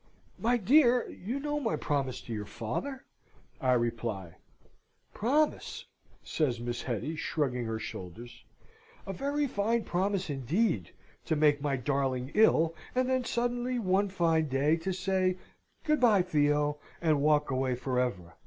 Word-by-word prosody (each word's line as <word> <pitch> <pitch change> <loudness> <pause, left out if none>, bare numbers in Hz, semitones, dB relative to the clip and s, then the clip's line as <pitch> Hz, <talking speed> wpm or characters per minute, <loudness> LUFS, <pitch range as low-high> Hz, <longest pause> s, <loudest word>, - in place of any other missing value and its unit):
"My 240 +2 +2
dear, 245 +2 +4
you 235 +9 -4
know 295 +1 -2
my 235 -6 0
promise 135 -4 -2
to 115 - -7
your 105 -1 -4
father?" 265 - -4 0.6
I 130 -1 +3
reply. 115 -7 -2 0.8
"Promise!" 290 +8 0 0.4
says 130 -7 0
Miss 120 0 -3
Hetty, 125 +6 -3
shrugging 135 -6 -1
her 110 0 -2
shoulders. 115 +4 -8 0.6
"A 195 - -4
very 285 +7 -1
fine 230 -1 0
promise, 190 +1 -1
indeed, 140 - 0 0.4
to 160 - +1
make 150 -1 +3
my 140 -1 0
darling 130 0 -1
ill, 165 -6 +4 0.2
and 255 0 +2
then 260 -1 +1
suddenly, 245 +1 -1
one 200 -2 +1
fine 165 -4 +2
day, 140 +3 +2
to 170 +3 -3
say, 185 0 0 0.5
'Good 305 -1 +2
bye, 215 -7 +5
Theo,' 150 -3 +1 0.2
and 155 -4 +2
walk 150 -1 +3
away 130 -1 0
for 125 0 -1
ever. 95 -9 -2
155 Hz, 145 wpm, -30 LUFS, -, 0.8 s, bye